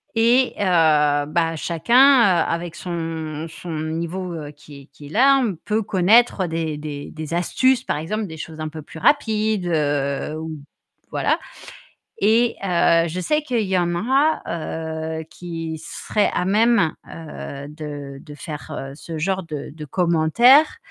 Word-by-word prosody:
Et 240 +3 +3
heu, - - +1 0.6
bah, 165 +1 0
chacun, 170 +9 0 0.4
avec 170 0 -3
son 165 -3 -5
son 170 +1 -9
niveau 170 +3 -4 0.2
qui 145 -1 -13
est - - -16
qui 145 - -12
est - - -12
là, 270 - +5
on 205 -7 -1
peut 215 +1 0
connaître 200 +1 +3
des 160 -2 -3
des 145 -1 -6
des 155 0 -7
astuces, 255 +9 +2
par - - -2
exemple, 210 +8 -3
des 160 -2 -9
choses 160 0 -8
un 155 0 -3
peu 155 0 -9
plus 160 - -11
rapides, 215 - +2
heu, 145 -1 -1
ou 160 -1 -6 0.5
voilà. - - 0 0.8
Et 230 +3 +3
heu, 170 -2 +3
je 170 +3 -4
sais 300 - +1
qu'il 250 -6 -1
y 190 -3 +1
en 175 0 0
a, 270 - +2 0.8
heu, - - -8
qui 165 -2 -6
seraient 210 - -1
à - - 0
même, 215 -3 +3 0.2
heu, 150 -3 -8
de 145 -3 -8
de 150 -3 -11
faire 145 -2 -7
ce 160 +3 -8
genre 190 +4 -1
de 155 -4 -7
de 155 -1 -8
commentaires 180 - +4
170 Hz, 150 wpm, -21 LUFS, 155-210 Hz, 0.8 s, là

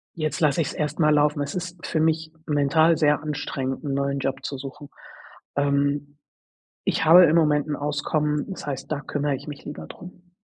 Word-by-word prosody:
Jetzt 155 -4 -2
lasse 150 0 +3
ich's 150 - -2
erst 150 +1 -3
mal 150 -2 +4
laufen. 150 0 +2
Es 145 0 -3
ist 180 -1 -6
für 160 - -1
mich 160 0 +1
mental 155 +2 +3
sehr 150 -1 +3
anstrengend 140 -3 -3
'n 140 -2 -2
neuen 140 0 -1
Job 135 0 -3
zu 140 - -4
suchen. 140 +2 -9 0.7
Ähm, 145 0 0 0.7
ich - - 0
habe 170 +3 +9
im 165 0 +4
Moment 150 -3 +3
'n 150 - -1
Auskommen, 150 +1 -1
das 190 - -7
heißt, 135 0 -4
da 145 - -2
kümmere 145 -1 -2
ich 135 - -7
mich 145 -1 -8
lieber 145 - -7
drum. 180 0 -13
150 Hz, 190 wpm, -24 LUFS, 140-160 Hz, 0.7 s, habe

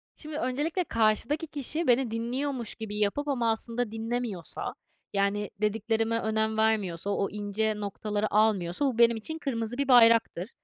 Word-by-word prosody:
Şimdi 305 -1 -7
öncelikle 300 +7 -1
karşıdaki 230 +6 +1
kişi 305 +3 -2
beni 245 -1 +3
dinliyormuş 240 +2 -3
gibi 210 -2 -6
yapıp 250 +8 0
ama, 240 -5 +1
aslında, 230 +1 -2
dinlemiyorsa, 225 -4 -3 0.4
yani, 200 +1 0
dediklerime 225 +2 0
önem 220 0 0
vermiyorsa, 205 -5 +1
o 200 -1 0
ince 210 +1 -1
noktaları 210 +1 -3
almıyorsa 210 +1 +2
bu 255 -4 0
benim 235 -1 +5
için 315 +9 -5
kırmızı 245 -4 -3
bir 280 - 0
bayraktır. 230 -5 +5
225 Hz, 140 wpm, -28 LUFS, 210-250 Hz, 0.4 s, benim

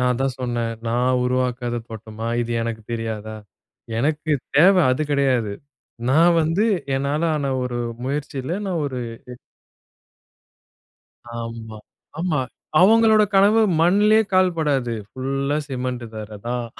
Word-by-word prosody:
நான்தான் 125 +1 0
சொன்னேன். 120 -2 -2 0.2
நான் 125 +2 +1
உருவாக்காத 125 -1 -1
தோட்டமா, 110 0 -7
இது 120 0 -4
எனக்கு 115 -1 -4
தெரியாதா? 110 -1 -4 0.6
எனக்கு 155 +3 0 0.2
தேவை 180 +3 +6
அது 130 +4 0
கிடையாது. 130 -7 +1 0.6
நான் 165 +5 +5
வந்து 165 +7 +1 0.3
என்னாலான 150 +1 0
ஒரு 120 -1 -3 0.3
முயற்சியில 145 +3 -3
நான் 180 -4 -1
ஒரு 130 -3 -4 2.4
ஆமா. 115 -1 -7 0.4
ஆமா. 165 -6 0 0.4
அவங்களோட 220 +2 +6
கனவு 205 +3 +5 0.2
மண்ணிலேயே 210 +6 +4
கால் 185 -2 +3
படாது. 135 -6 0 0.2
ஃபுல்லா 135 +2 -2
சிமெண்ட் 125 -2 -3
தரைதான். 110 +3 -5
130 Hz, 105 wpm, -22 LUFS, 120-160 Hz, 2.4 s, தேவை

